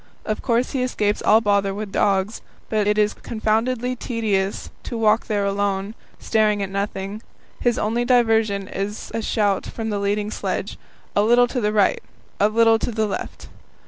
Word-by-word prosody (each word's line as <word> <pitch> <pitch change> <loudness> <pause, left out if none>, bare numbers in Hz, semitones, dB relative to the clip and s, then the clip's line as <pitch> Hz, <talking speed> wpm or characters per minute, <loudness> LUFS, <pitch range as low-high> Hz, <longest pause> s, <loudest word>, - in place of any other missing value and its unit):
Of 215 - -2
course 240 0 +1
he 265 - -1
escapes 210 -5 0
all 220 +2 +5
bother 200 -2 +1
with 210 -1 -5
dogs, 195 +2 +1 0.3
but 215 -2 +1
it 210 0 +2
is 210 0 +3
confoundedly 230 +3 -1
tedious 210 -6 -2
to 235 - -5
walk 220 0 +2
there 205 -2 0
alone, 200 0 -1 0.2
staring 215 -2 +1
at 195 - -5
nothing. 200 +1 -3 0.4
His 240 -1 +1
only 230 +3 0
diversion 225 -5 +2
is 205 +2 -5
a 225 - -1
shout 205 -3 0
from 225 -1 -4
the 205 - -1
leading 205 +1 -1
sledge: - - -3 0.4
"A 205 - +4
little 240 +3 +5
to 245 +1 -3
the 210 -1 +1
right," 210 -2 +2 0.4
"A 205 - +4
little 225 0 +4
to - - -2
the 220 -1 0
left." 205 - -5
215 Hz, 175 wpm, -22 LUFS, 200-230 Hz, 0.4 s, all